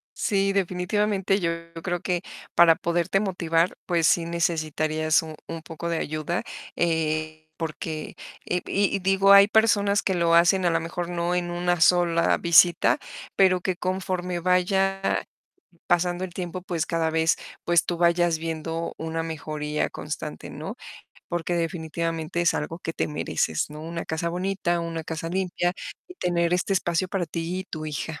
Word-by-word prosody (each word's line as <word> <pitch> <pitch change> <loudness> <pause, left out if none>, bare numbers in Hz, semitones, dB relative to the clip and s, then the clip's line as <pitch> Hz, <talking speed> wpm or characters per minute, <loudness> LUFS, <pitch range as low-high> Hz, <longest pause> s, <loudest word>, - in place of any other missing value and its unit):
Sí, 195 -1 +1
definitivamente 195 +1 0
yo 170 -2 0 0.3
creo 175 -1 -2
que 180 -2 -1 0.3
para 165 -1 +7
poderte 175 +3 0
motivar, 175 -4 0
pues, 170 -3 +2
sí 170 -1 +3
necesitarías 155 -1 +1
un 160 -1 -8
un 165 -1 -6
poco 165 +1 -7
de 165 - 0
ayuda, 155 +3 -2 0.3
eh, 155 -1 -1
porque, 155 -1 -5 0.3
eh, 180 0 -1
y 200 0 +1
y - - -1
digo, 195 +1 +4
hay 200 +1 +9
personas 205 -2 +3
que 190 - 0
lo 170 -1 +2
hacen 175 +2 +4
a - - +4
lo 165 0 +2
mejor 170 +1 -4
no 175 0 -1
en 175 -1 -1
una 175 0 0
sola 170 0 +4
visita, 170 0 +5 0.4
pero 185 -2 +4
que 185 0 -1
conforme 180 -1 -2
vaya 190 +2 +1 0.7
pasando 175 +1 +1
el 185 - -7
tiempo, 180 0 -5
pues, 175 -3 -2
cada 165 -1 0
vez, 160 0 +2 0.3
pues, 170 -1 +3
tú 175 - -2
vayas 170 -1 +3
viendo 165 0 -4
una 160 0 -3
mejoría 150 -1 -3
constante, - - -6
¿no?, - - -7 0.5
porque 175 0 -2
definitivamente, 165 -1 -2
es 170 - +3
algo 160 +3 -3
que 165 - -5
te - - -2
mereces, 80 - -1
¿no?, 150 0 -8
una 165 +1 -5
casa 160 +1 -2
bonita, 175 -1 -1
una 165 -1 -4
casa 160 +1 -4
limpia 175 -1 -1 0.3
y 360 - -12
tener 175 - 0
este 180 +2 0
espacio 175 -1 0
para 185 -2 -2
ti 165 +3 -3
y - - -7
tu 155 -4 -6
hija. 155 +1 -4
170 Hz, 160 wpm, -25 LUFS, 165-180 Hz, 0.7 s, hay